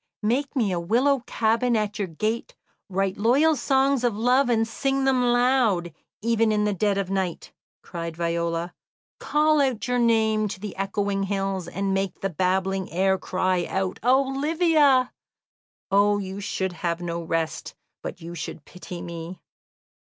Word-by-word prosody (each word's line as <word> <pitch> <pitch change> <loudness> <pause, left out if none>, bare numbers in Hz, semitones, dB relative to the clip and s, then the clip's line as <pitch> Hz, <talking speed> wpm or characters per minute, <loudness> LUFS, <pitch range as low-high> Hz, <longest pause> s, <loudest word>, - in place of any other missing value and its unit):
"Make 265 +7 0
me 225 -7 +1
a 175 - -1
willow 250 +10 +2
cabin 230 +2 +1
at 210 -1 -2
your 200 - -1
gate, 220 - -3 0.3
write 195 0 -1
loyal 280 +9 +4
songs 270 0 +2
of 235 -4 +1
love, 250 +3 +3
and 225 -1 +2
sing 270 +4 -1
them 265 -2 +3
loud, 245 - +2 0.3
even 230 -1 +2
in 210 -1 +1
the 210 0 +1
dead 200 +1 +1
of 195 -1 -2
night," 190 -3 -3 0.3
cried 170 -2 -6
Viola; 170 0 -1 0.5
"call 305 0 +2
out 255 -4 0
your 250 0 +1
name 220 -2 +2
to 195 - -6
the 205 -1 -6
echoing 195 +1 -1
hills, 195 -2 -2
and 195 +2 -2
make 195 -1 -2
the 195 - -1
babbling 190 +2 0
air 190 +2 +2
cry 185 -1 0
out 190 -1 -2
'Olivia!' 275 +1 +3 0.8
Oh, 205 +1 +4
you 195 0 -5
should 190 -2 -2
have 170 0 -2
no 170 -1 -4
rest, 165 -1 -3 0.3
but - - -7
you 170 +1 -7
should 155 -2 -7
pity 180 -1 -9
me!" 170 +1 -7
205 Hz, 155 wpm, -25 LUFS, 185-245 Hz, 0.8 s, loyal